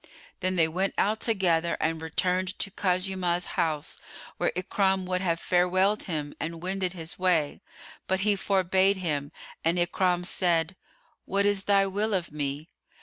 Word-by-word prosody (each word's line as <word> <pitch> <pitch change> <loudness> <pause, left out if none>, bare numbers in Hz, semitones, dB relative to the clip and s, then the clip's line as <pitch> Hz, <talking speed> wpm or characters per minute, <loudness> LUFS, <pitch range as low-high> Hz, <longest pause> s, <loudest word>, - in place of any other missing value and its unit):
Then 185 0 -1
they 165 -2 +4
went 185 +5 -1
out 215 +2 +1
together 175 -7 +1
and 160 0 -1
returned 180 +3 -1
to 195 - -3
Khuzaymah's 180 -2 0
house, 155 -3 -1 0.4
where - - +1
Ikrimah 190 +1 +1
would 180 0 -1
have 170 -3 0
farewelled 185 +4 +2
him 150 -5 -3
and 165 0 -4
wended 185 -1 -1
his 165 -1 -8
way; 170 -6 +1 0.5
but 190 0 +1
he 205 0 +3
forbade 190 0 +2
him 150 -5 -2 0.3
and 165 +2 +2
Ikrimah 175 0 +1
said, 175 -1 +2 0.5
"What 200 +1 +1
is 205 -1 +2
thy 200 -1 +4
will 205 +2 0
of 175 -4 -2
me?" 145 +1 -3
180 Hz, 150 wpm, -27 LUFS, 165-190 Hz, 0.5 s, they